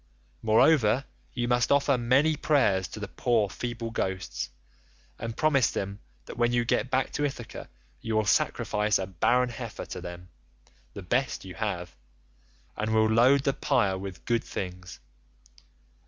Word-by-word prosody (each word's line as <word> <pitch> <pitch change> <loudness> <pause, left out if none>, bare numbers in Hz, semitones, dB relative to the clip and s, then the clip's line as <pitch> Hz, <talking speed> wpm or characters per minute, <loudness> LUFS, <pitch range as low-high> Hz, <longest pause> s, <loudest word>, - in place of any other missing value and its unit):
Moreover 115 +2 +4 0.3
you 120 -1 -2
must 120 0 +2
offer 140 0 +4
many 130 +6 +3
prayers 130 -12 +2
to - - -9
the - - -5
poor 115 -5 +1
feeble 120 -1 -5
ghosts, 90 - -3 0.7
and 115 0 -5
promise 140 -7 +3
them 100 +1 -4 0.3
that - - -9
when 120 0 +3
you 120 -1 +1
get 125 - 0
back 130 0 0
to 145 - -2
Ithaca 135 -5 -5 0.3
you 115 -1 -2
will 110 -1 +2
sacrifice 105 +1 +1
a 95 - -3
barren 120 +8 +2
heifer 115 -2 -6
to - - -7
them, 90 0 -9 0.7
the 100 - -7
best 120 +4 -1
you 95 - -8
have, 90 -7 -4 0.8
and 110 +1 -2
will 110 0 +5
load 130 +5 +5
the 140 - +1
pyre 120 -11 +1
with 95 -2 -8
good 115 -1 +1
things. 90 -2 -6
115 Hz, 155 wpm, -27 LUFS, 95-125 Hz, 0.8 s, will